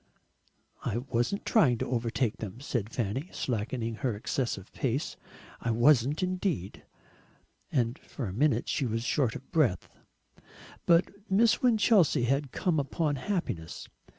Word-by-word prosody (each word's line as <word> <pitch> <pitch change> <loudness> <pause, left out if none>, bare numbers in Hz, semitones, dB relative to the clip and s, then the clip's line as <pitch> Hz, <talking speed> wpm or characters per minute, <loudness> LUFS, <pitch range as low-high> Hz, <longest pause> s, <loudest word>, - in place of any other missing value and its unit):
"I 105 - -1
wasn't 120 +8 -1
trying 140 - +4
to - - -2
overtake 120 -1 -1
them," 105 +1 -7
said 120 -6 -2
Fanny, 125 - -2
slackening 115 -1 -2
her 120 -3 -1
excessive 105 -2 -3
pace; 135 +3 -1 0.4
"I 115 - -3
wasn't 130 +6 +4
indeed." 180 - -2 0.9
And 120 0 0
for 135 - -6
a 95 - -4
minute 145 +7 +2
she 140 -4 0
was 115 0 -2
short 125 -2 +1
of 135 - -10
breath. 130 - +1 1.0
But 190 +4 +2
Miss 215 +3 +4
Winchelsea 210 - +4
had 135 +2 0
come 175 -6 0
upon 145 +1 -1
happiness. 130 - -3
130 Hz, 130 wpm, -29 LUFS, 115-160 Hz, 1.0 s, trying